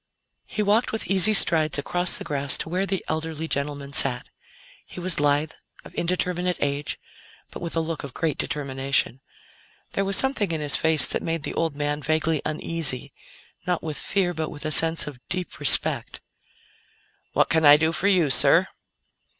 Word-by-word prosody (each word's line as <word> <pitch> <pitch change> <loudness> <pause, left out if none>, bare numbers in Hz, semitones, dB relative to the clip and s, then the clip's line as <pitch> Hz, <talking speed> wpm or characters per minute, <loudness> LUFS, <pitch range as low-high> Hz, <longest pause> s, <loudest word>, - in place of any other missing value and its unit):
He 215 - -3
walked 210 +4 +1
with 220 - -2
easy 195 +2 +4
strides 155 -5 +2
across 175 +5 -1
the - - -7
grass 140 -1 0
to - - -5
where 185 +3 -1
the 190 -2 -3
elderly 160 0 -4
gentleman 140 -1 -4
sat. - - +3 0.5
He - - -11
was 180 -3 +1
lithe, 145 +1 +1 0.3
of - - -13
indeterminate 180 0 -2
age, 145 0 -3 0.5
but - - -9
with 170 -1 -5
a 165 - +1
look 160 -1 -5
of 140 -2 -9
great 155 -4 -2
determination. 135 -2 -2 0.7
There 195 - -1
was 195 0 +1
something 255 -9 +1
in 160 - -2
his 145 -1 0
face 160 -2 +5
that - - +1
made 165 -2 -3
the - - -4
old 165 -3 -2
man 145 0 -3
vaguely 155 +1 0
uneasy 155 -3 -2 0.5
not 180 -2 -1
with 155 -2 -5
fear 185 -3 -1
but 160 -1 -4
with 150 +1 -10
a 155 - -2
sense 165 +1 +3
of 145 -4 -9
deep 180 0 -1
respect. 145 -3 +3 1.1
"What - - +2
can 160 0 +2
I 145 0 +8
do 160 +1 +1
for 185 +4 -1
you, 175 -8 +2
sir?" - - +3
160 Hz, 175 wpm, -24 LUFS, 145-175 Hz, 1.1 s, I